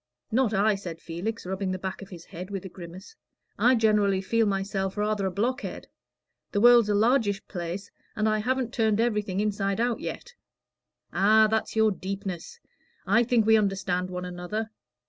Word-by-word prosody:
"Not 240 -1 +2
I," 215 +1 +3
said 180 -5 -6
Felix, 180 +8 -5
rubbing 190 +1 -2
the 185 - -2
back 190 +1 -5
of 195 - -10
his 170 -3 -11
head, 180 +3 -8
with 195 -2 -5
a - - -6
grimace. 180 - -11 0.4
"I 250 +1 +5
generally 210 -4 +3
feel 225 +3 +1
myself 195 0 -2
rather 210 -1 0
a - - -2
blockhead. 235 +8 -3 0.7
The 205 - +2
world's 240 -1 +6
a 205 - +2
largish 215 -2 +2
place, 175 +2 -5 0.2
and 215 0 +1
I 215 0 +2
haven't 250 +2 -1
turned 220 -2 +2
everything 210 -5 0
inside 200 -1 -1
out 240 -1 0
yet." 480 - -6 0.8
"Ah, 215 +3 +5
that's 220 +1 -1
your 220 -1 +4
deepness. 190 - -6 0.5
I 225 +5 +4
think 235 -2 +2
we 220 0 +6
understand 190 -3 0
one 180 0 -5
another. 180 +5 -4
205 Hz, 170 wpm, -27 LUFS, 190-220 Hz, 0.8 s, world's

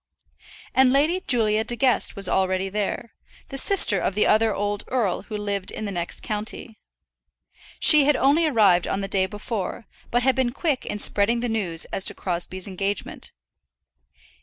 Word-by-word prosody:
And 260 -1 +4
Lady 310 +7 +2
Julia 220 -3 +2
De 240 +2 -2
Guest 255 0 +1
was 200 -2 -1
already 190 0 0
there, 210 +3 -4 0.4
the 270 - -6
sister 260 - +4
of 190 - -2
the 210 - +2
other 220 +1 +3
old 205 0 -2
earl 230 -8 -1
who 215 - -7
lived 200 -2 -3
in 215 - -5
the 200 - -4
next 175 -2 -5
county. 215 +1 -5 1.0
She 300 -3 +7
had 295 0 +3
only 290 +6 +3
arrived 200 - +3
on 195 - -2
the 195 - -3
day 190 -1 +1
before, 210 +1 -5 0.2
but 245 +1 0
had 265 0 +3
been 255 -2 0
quick 290 -2 -2
in - - -3
spreading 210 +3 +1
the 245 - -2
news 185 -7 -1
as 195 - -1
to - - +4
Crosbie's 180 +1 -4
engagement. 195 +1 -4
215 Hz, 170 wpm, -23 LUFS, 195-250 Hz, 1.0 s, She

